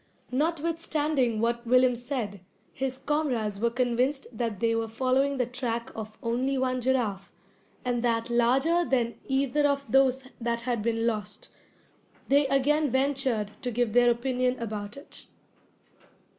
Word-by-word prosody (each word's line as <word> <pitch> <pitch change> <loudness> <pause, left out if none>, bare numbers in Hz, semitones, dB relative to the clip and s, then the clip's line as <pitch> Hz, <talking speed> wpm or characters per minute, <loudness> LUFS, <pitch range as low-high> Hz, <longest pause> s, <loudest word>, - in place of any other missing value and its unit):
Notwithstanding 305 -5 0
what 235 +1 -1
Willem 255 0 +5
said, 235 -5 -4 0.3
his 265 -1 -2
comrades 255 -9 -1
were 235 +2 +2
convinced 250 +3 0
that 225 -3 -2
they 230 +1 +2
were 225 0 -1
following 260 +4 +1
the 250 - +1
track 235 -1 -4
of 215 -1 -7
only 255 +4 0
one 255 -1 0
giraffe, 235 -7 -1 0.5
and 245 -1 0
that 230 -1 0
larger 265 +9 +3
than 245 -6 0
either 275 +2 +2
of 280 0 0
those 265 0 +4 0.2
that 235 0 -1
had 240 -2 -1
been 225 +1 0
lost. 230 - -3 0.8
They 280 +1 +4
again 290 +3 +2
ventured 265 -5 0
to 250 - -2
give 240 -2 0
their 245 0 +5
opinion 250 +1 0
about 210 -1 -5
it. 280 - -9
250 Hz, 140 wpm, -27 LUFS, 230-270 Hz, 0.8 s, Willem